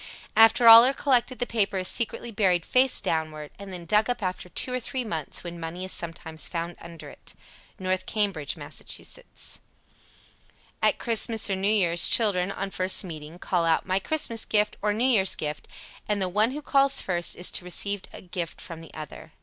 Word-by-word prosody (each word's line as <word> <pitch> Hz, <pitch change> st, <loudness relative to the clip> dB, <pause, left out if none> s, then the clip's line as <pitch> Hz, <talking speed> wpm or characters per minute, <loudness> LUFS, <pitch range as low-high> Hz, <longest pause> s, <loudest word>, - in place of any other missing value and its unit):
After 225 Hz, +2 st, +6 dB
all 230 Hz, +1 st, +11 dB
are 265 Hz, +2 st, +2 dB
collected 255 Hz, -2 st, 0 dB
the 245 Hz, -, -1 dB
paper 205 Hz, -4 st, -1 dB
is 185 Hz, -1 st, 0 dB
secretly 235 Hz, 0 st, 0 dB
buried 185 Hz, -6 st, +1 dB
face 255 Hz, 0 st, +3 dB
downward, 155 Hz, -2 st, -3 dB
and 200 Hz, -1 st, -9 dB
then 175 Hz, -2 st, -8 dB
dug 210 Hz, +6 st, +1 dB
up 245 Hz, -3 st, -3 dB
after 185 Hz, -1 st, -4 dB
two 250 Hz, -, -1 dB
or 255 Hz, -, -1 dB
three 255 Hz, +1 st, -4 dB
months, 160 Hz, -9 st, -4 dB
when 170 Hz, -1 st, -8 dB
money 170 Hz, +3 st, -6 dB
is 185 Hz, -, -5 dB
sometimes 165 Hz, -1 st, -3 dB
found 170 Hz, 0 st, -5 dB
under 170 Hz, -1 st, -11 dB
it. -, -, -13 dB, 0.4 s
North 185 Hz, -1 st, -2 dB
Cambridge, 195 Hz, -10 st, -2 dB
Mass. -, -, -8 dB
78. -, -, -5 dB, 1.2 s
At -, -, +2 dB
Christmas 225 Hz, -2 st, +2 dB
or -, -, +1 dB
New 195 Hz, +2 st, +1 dB
Year's 175 Hz, -5 st, +4 dB
children, 195 Hz, -4 st, +2 dB
on 195 Hz, 0 st, -5 dB
first 185 Hz, +2 st, +3 dB
meeting, 160 Hz, -2 st, -9 dB
call 180 Hz, -1 st, -1 dB
out 165 Hz, -1 st, +1 dB
"My 185 Hz, +1 st, 0 dB
Christmas 230 Hz, -2 st, -1 dB
gift," 210 Hz, 0 st, 0 dB
or 210 Hz, -, +1 dB
"New 220 Hz, +4 st, 0 dB
Year's 210 Hz, -8 st, +3 dB
gift," 150 Hz, 0 st, -6 dB, 0.4 s
and 210 Hz, -1 st, -1 dB
the 190 Hz, -, 0 dB
one 210 Hz, +5 st, +2 dB
who 295 Hz, +3 st, -7 dB
calls 275 Hz, -1 st, +3 dB
first 175 Hz, -2 st, -1 dB
is 180 Hz, -, -1 dB
to -, -, -2 dB
receive 200 Hz, +2 st, -1 dB
a -, -, -11 dB
gift 175 Hz, -2 st, -6 dB
from 165 Hz, -2 st, -8 dB
the 165 Hz, -, -13 dB
other. 155 Hz, +1 st, -10 dB
190 Hz, 195 wpm, -25 LUFS, 170-225 Hz, 1.2 s, all